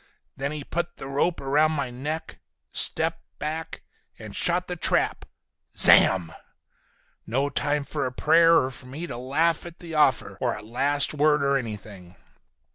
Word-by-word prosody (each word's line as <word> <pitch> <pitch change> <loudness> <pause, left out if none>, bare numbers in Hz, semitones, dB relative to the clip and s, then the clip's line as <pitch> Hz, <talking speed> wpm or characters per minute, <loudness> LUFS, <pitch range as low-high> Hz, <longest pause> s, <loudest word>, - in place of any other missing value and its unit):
Then 140 +1 -3
he 150 -1 -6
put 170 +3 -4
the 135 - -8
rope 145 +5 0
around 150 +3 +2
my 140 -4 -3
neck, 150 +6 -5 0.3
stepped 165 +1 0 0.2
back 155 +2 -5 0.3
and 110 -2 -10
shot 180 +1 0
the 180 - -4
trap. 165 - 0 0.5
Zamm! 90 -4 +6 0.9
No 135 +5 0
time 145 +1 -1
for 140 -1 -3
a - - -5
prayer—or 165 -1 +4
for 125 - -13
me 145 +7 -6
to - - -7
laugh 155 +6 0
at 170 0 -10
the 170 -2 -9
offer!—or 125 -6 +1
a 105 - -9
last 140 +7 +1
word 150 -1 +2
or 140 0 +2
anything. 105 -7 -6
145 Hz, 150 wpm, -25 LUFS, 125-160 Hz, 0.9 s, Zamm